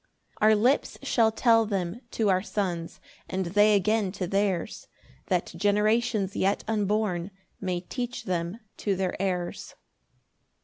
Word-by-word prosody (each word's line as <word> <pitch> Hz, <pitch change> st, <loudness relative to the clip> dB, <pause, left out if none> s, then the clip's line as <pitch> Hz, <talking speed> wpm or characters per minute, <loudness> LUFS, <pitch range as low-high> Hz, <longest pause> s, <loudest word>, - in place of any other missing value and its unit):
3 215 Hz, -, +4 dB
Our 220 Hz, -, +6 dB
lips 245 Hz, +7 st, +2 dB
shall 225 Hz, -2 st, +3 dB
tell 225 Hz, 0 st, +3 dB
them 195 Hz, +1 st, -2 dB
to 220 Hz, -1 st, 0 dB
our 185 Hz, -1 st, +3 dB
Sons, 180 Hz, -5 st, -3 dB, 0.3 s
And 190 Hz, 0 st, -1 dB
they 205 Hz, +4 st, +4 dB
again 205 Hz, 0 st, +1 dB
to 195 Hz, -2 st, -3 dB
theirs, 195 Hz, -1 st, -1 dB, 0.4 s
That 180 Hz, -3 st, -1 dB
generations 210 Hz, +1 st, +1 dB
yet 195 Hz, +2 st, +1 dB
unborn 210 Hz, -4 st, 0 dB, 0.3 s
May 180 Hz, -2 st, -2 dB
teach 245 Hz, +6 st, -5 dB
them 180 Hz, +4 st, -3 dB, 0.2 s
to 200 Hz, -2 st, 0 dB
their 185 Hz, -1 st, -1 dB
heirs. 180 Hz, -3 st, -3 dB
200 Hz, 135 wpm, -27 LUFS, 185-215 Hz, 0.4 s, Our